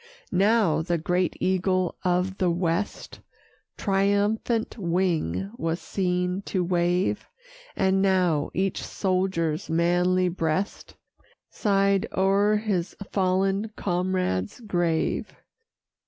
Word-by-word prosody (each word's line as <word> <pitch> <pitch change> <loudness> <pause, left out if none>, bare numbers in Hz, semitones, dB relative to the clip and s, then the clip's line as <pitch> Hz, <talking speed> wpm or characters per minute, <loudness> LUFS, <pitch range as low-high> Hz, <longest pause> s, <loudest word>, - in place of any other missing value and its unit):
Now 195 -3 +3
the 170 +1 0
great 180 +2 0
Eagle 185 -1 +1
of 180 +1 0
the 185 - +2
West 170 +3 -2 0.6
Triumphant 205 +3 +1
wing 165 - 0
was 165 +2 -2
seen 180 0 -1
to 185 -2 0
wave! 175 +1 0 0.5
And 190 0 +2
now 180 -6 +2
each 190 0 -1
soldier's 185 -3 -1
manly 175 +2 +2
breast 175 +2 -2 0.6
Sigh'd 195 -2 +2
o'er 200 +2 +3
his 205 -5 -1 0.2
fallen 195 +2 +1
comrade's 180 - -1
grave. 175 -6 -1
185 Hz, 95 wpm, -25 LUFS, 175-195 Hz, 0.6 s, Now